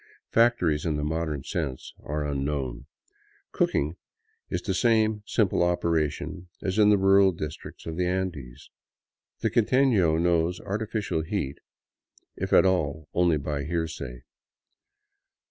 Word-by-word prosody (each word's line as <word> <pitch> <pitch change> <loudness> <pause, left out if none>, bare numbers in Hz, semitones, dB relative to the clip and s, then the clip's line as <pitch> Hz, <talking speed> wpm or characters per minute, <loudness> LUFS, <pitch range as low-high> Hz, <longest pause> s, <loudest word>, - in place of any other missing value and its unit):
Factories, 100 -11 +3
in 80 -3 0
the 75 - -2
modern 75 -2 -2
sense, 65 -1 -4
are 75 0 -3
unknown; 70 -3 -3 0.6
cooking 75 +5 0 0.5
is 90 - -3
the 95 - -1
same 110 0 +2
simple 100 -5 +1
operation 85 0 -1
as 95 +1 -1
in 105 -1 +6
the 105 - +5
rural 95 0 +5
districts 75 -3 -7
of 80 0 -5
the 90 -1 +1
Andes. 90 -10 -4 0.7
The - - +1
quiteno 115 -9 +3
knows 85 0 +1
artificial 105 -3 -2
heat, 80 -5 -3 0.8
if - - -4
at - - +6
all, 80 -5 0
only 85 -3 +3
by 70 0 -3
hearsay. 80 -7 -4
85 Hz, 125 wpm, -26 LUFS, 75-95 Hz, 0.8 s, in